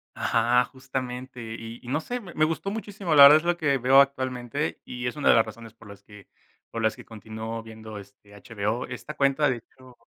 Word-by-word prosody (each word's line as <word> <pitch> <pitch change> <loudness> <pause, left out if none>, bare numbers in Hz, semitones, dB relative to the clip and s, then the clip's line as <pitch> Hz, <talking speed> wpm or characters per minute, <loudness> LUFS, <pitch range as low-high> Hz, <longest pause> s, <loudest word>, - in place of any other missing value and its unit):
Ajá, 125 +1 +2
justamente. 130 -1 -6 0.2
Y 115 +1 -9
y 120 - -15
no 145 +5 -1
sé, 245 +9 -4
me 190 -7 -11
me 155 - +1
gustó 165 +5 -2
muchísimo, 200 -6 -3
la 140 - +10
verdad 145 +2 +10
es 155 - -3
lo 175 0 +2
que 145 -5 +1
veo 130 +2 +6
actualmente, 130 +1 -2
y 125 0 -5
es 125 - -3
una 150 - +1
de - - +7
las 115 - +4
razones 110 0 -11
por 115 -2 -17
las 100 0 -13
que 105 -2 -15 0.4
por 115 - -5
las 110 -1 +1
que - - -13
continúo 110 +1 -7
viendo, 110 -1 -10
este, 100 +1 -15
HBO. 105 +3 -3
Esta 125 +4 -7
cuenta, 140 +1 +2
de 125 - -1
hecho 125 +1 -18
125 Hz, 220 wpm, -26 LUFS, 110-140 Hz, 0.4 s, la